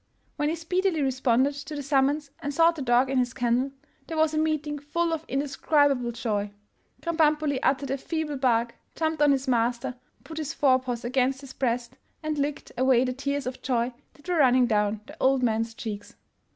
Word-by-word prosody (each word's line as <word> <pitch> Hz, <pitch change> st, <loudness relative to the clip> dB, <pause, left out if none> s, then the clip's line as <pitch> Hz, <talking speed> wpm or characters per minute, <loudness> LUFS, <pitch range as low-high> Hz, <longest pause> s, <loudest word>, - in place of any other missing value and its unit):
When 295 Hz, 0 st, 0 dB
he 325 Hz, -, 0 dB
speedily 340 Hz, -1 st, 0 dB
responded 265 Hz, +1 st, +2 dB
to 285 Hz, +1 st, -7 dB
the 285 Hz, -, -4 dB
summons 280 Hz, +1 st, +1 dB
and 290 Hz, -3 st, -3 dB
sought 330 Hz, +3 st, +4 dB
the 305 Hz, -, -6 dB
dog 245 Hz, 0 st, +3 dB
in 265 Hz, -, +2 dB
his 250 Hz, 0 st, -1 dB
kennel, 245 Hz, +1 st, +1 dB, 0.4 s
there 325 Hz, -, -4 dB
was 315 Hz, 0 st, +3 dB
a 310 Hz, -, +1 dB
meeting 305 Hz, -2 st, -1 dB
full 330 Hz, +4 st, -1 dB
of 320 Hz, -1 st, -3 dB
indescribable 280 Hz, -2 st, +1 dB
joy. 210 Hz, -3 st, -2 dB, 0.5 s
Krambambuli 305 Hz, -4 st, +2 dB
uttered 270 Hz, 0 st, +1 dB
a 275 Hz, -, -1 dB
feeble 315 Hz, -1 st, -3 dB
bark, 235 Hz, -3 st, +1 dB, 0.2 s
jumped 315 Hz, -1 st, -1 dB
on 295 Hz, -1 st, +6 dB
his 270 Hz, 0 st, 0 dB
master, 240 Hz, 0 st, +1 dB, 0.3 s
put 320 Hz, -1 st, -7 dB
his 305 Hz, -1 st, -4 dB
fore 260 Hz, -3 st, +4 dB
paws 245 Hz, -2 st, -4 dB
against 260 Hz, +2 st, +1 dB
his 270 Hz, -2 st, -10 dB
breast, 240 Hz, -2 st, -2 dB, 0.2 s
and 305 Hz, -1 st, -2 dB
licked 285 Hz, 0 st, -3 dB
away 260 Hz, -1 st, +4 dB
the 255 Hz, -, -1 dB
tears 280 Hz, +2 st, -2 dB
of 255 Hz, +1 st, -5 dB
joy 245 Hz, -1 st, 0 dB, 0.2 s
that 290 Hz, +5 st, -19 dB
were 355 Hz, -1 st, +1 dB
running 255 Hz, -3 st, +5 dB
down 210 Hz, -2 st, +1 dB
the 295 Hz, +4 st, -12 dB
old 265 Hz, -1 st, +3 dB
man's 225 Hz, -1 st, 0 dB
cheeks. 210 Hz, -3 st, -6 dB
270 Hz, 190 wpm, -26 LUFS, 245-300 Hz, 0.5 s, on